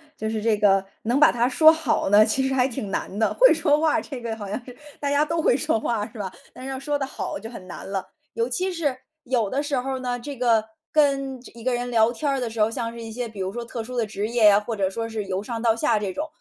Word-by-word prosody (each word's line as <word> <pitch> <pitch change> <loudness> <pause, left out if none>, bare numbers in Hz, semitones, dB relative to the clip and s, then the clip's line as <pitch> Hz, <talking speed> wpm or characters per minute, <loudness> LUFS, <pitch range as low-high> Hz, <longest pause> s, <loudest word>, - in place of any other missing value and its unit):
就 220 - -3
是 220 -1 -2
这 220 -1 +2
个 195 -2 +3 0.2
能 240 +4 +1
把 305 - +7
它 240 +1 +1
说 315 +5 +7
好 320 -10 0
呢， 210 +1 +7
其 265 +5 0
实 270 - -1
还 255 -1 +3
挺 215 -5 -5
难 195 - -3
的， 220 - +2
会 - - +7
说 305 -2 +2
话 315 -1 +2
这 265 -5 -7
个 230 -1 -3
好 210 -2 -7
像 235 +5 -4
是 250 - -11 0.2
大 285 - -1
家 285 +1 +3
都 325 +2 -1
会 245 - +3
说 290 -6 0
话 215 -2 -1
是 230 - -11
吧？ 190 -2 -3 0.2
但 - - -12
是 270 - -5
要 265 - -4
说 290 +1 -2
得 270 - -1
好 265 - -5
就 225 +2 -8
很 225 -6 -10
难 180 - -8
了。 195 -1 -2 0.3
尤 230 0 0
其 365 +10 -1
是 315 -7 -1 0.3
有 240 -6 0
的 275 +5 -1
时 290 -2 -1
候 265 +1 -3
呢， 245 -1 -3
这 285 +3 -7
个 230 -3 +3 0.3
跟 275 -3 +2
这 245 - -14
一 230 - -10
个 255 +1 +1
人 245 0 -2
聊 230 -1 +4
天 285 +5 -2
儿 275 - +1
的 245 -2 -2
时 225 - -8
候， 215 +1 +4
像 230 -1 -3
是 235 0 -9
一 225 - -7
些 240 +1 -4
比 215 -2 -11
如 190 +1 -3
说 240 +1 -4
特 235 0 -5
殊 250 +3 -7
的 235 -2 +1
职 210 0 -3
业 235 -1 +2
呀， 205 0 +7
或 220 +2 -4
者 195 -2 0
说 225 +4 -4
是 220 -2 -4
由 190 0 -2
上 225 +2 -5
到 230 -1 +4
下 225 -1 +1
这 205 -2 -2
种， 300 +8 -3
235 Hz, 315 characters per minute, -24 LUFS, 220-270 Hz, 0.3 s, 把